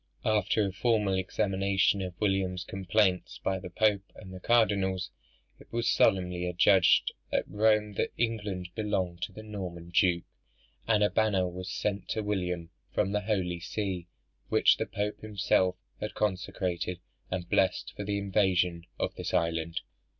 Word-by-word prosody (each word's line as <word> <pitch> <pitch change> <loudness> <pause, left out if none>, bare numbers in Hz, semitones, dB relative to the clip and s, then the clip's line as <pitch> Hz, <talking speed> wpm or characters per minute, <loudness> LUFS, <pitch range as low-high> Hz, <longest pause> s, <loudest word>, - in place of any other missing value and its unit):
After 110 0 +2
a 100 - -2
formal 105 0 +1
examination 95 +1 +1
of 90 -2 -6
William's 95 -3 0
complaints 95 0 0
by 95 0 0
the 90 - -8
Pope 100 +1 +1
and 95 -3 -11
the 95 - -7
cardinals, 95 -4 +2 0.5
it - - -17
was 120 0 -1
solemnly 90 -5 +2
adjudged 90 +1 +4 0.2
at - - 0
Rome 105 0 +2
that - - +1
England 105 -6 -2
belonged 95 -5 -2
to 90 - -3
the 110 +3 -10
Norman 90 -5 -7
duke; 90 -2 +3 0.6
and 110 -2 +4
a 105 - +3
banner 100 -4 +2
was 90 +1 -6
sent 100 +1 -2
to 110 - -1
William 90 -5 -2 0.2
from 95 - 0
the 105 0 0
holy 95 -5 -1
see, 95 -1 -3 0.4
which - - +5
the - - -2
Pope 105 +1 -3
himself 95 -3 +1 0.2
had 105 - -5
consecrated 90 -3 -2 0.3
and 90 -1 -3
blessed 95 +1 +1
for 105 - -4
the 100 0 -1
invasion 90 -4 +1
of - - -1
this - - -3
island. 85 +1 0
95 Hz, 150 wpm, -29 LUFS, 90-105 Hz, 0.6 s, which